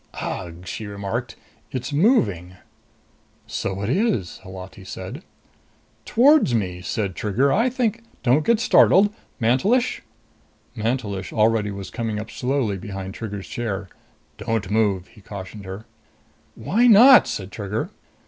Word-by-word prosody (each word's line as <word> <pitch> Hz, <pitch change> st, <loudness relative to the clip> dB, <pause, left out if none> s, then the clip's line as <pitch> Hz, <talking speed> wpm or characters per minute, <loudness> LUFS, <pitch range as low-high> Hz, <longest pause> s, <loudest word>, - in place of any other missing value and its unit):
"Ugh!" 85 Hz, 0 st, -5 dB
she 105 Hz, +3 st, -5 dB
remarked. 100 Hz, +4 st, -4 dB, 0.4 s
"It's 130 Hz, +3 st, -4 dB
moving!" 105 Hz, -, +2 dB, 0.9 s
"So 100 Hz, +1 st, -3 dB
it 100 Hz, -, -2 dB
is," 140 Hz, -, 0 dB
Holati 95 Hz, 0 st, -10 dB
said. -, -, -7 dB, 0.8 s
"Towards 270 Hz, -, +4 dB
me!" 90 Hz, -5 st, -2 dB
said 100 Hz, +1 st, -2 dB
Trigger. 120 Hz, +6 st, +1 dB
"I 230 Hz, +5 st, +3 dB
think 235 Hz, -3 st, -1 dB
" -, -, -32 dB
"Don't 135 Hz, +5 st, +3 dB
get 230 Hz, +3 st, +3 dB
startled. 205 Hz, -2 st, +5 dB, 0.3 s
Mantelish!" 195 Hz, -, +2 dB, 0.7 s
Mantelish 110 Hz, -4 st, -2 dB
already 110 Hz, -1 st, +2 dB
was 100 Hz, -1 st, -7 dB
coming 115 Hz, -2 st, -3 dB
up 110 Hz, +1 st, -7 dB
slowly 125 Hz, -6 st, -1 dB
behind 95 Hz, 0 st, -6 dB
Trigger's 100 Hz, -3 st, -6 dB
chair. 105 Hz, -5 st, -4 dB, 0.5 s
"Don't 105 Hz, -3 st, -2 dB
move!" 105 Hz, -4 st, +1 dB
he 105 Hz, -, -18 dB
cautioned 100 Hz, 0 st, -9 dB
her. 95 Hz, +4 st, -7 dB, 0.7 s
"Why 235 Hz, +6 st, +2 dB
not?" 245 Hz, +4 st, +8 dB
said 95 Hz, 0 st, -5 dB
Trigger. 110 Hz, -, -4 dB
110 Hz, 130 wpm, -23 LUFS, 100-140 Hz, 0.9 s, not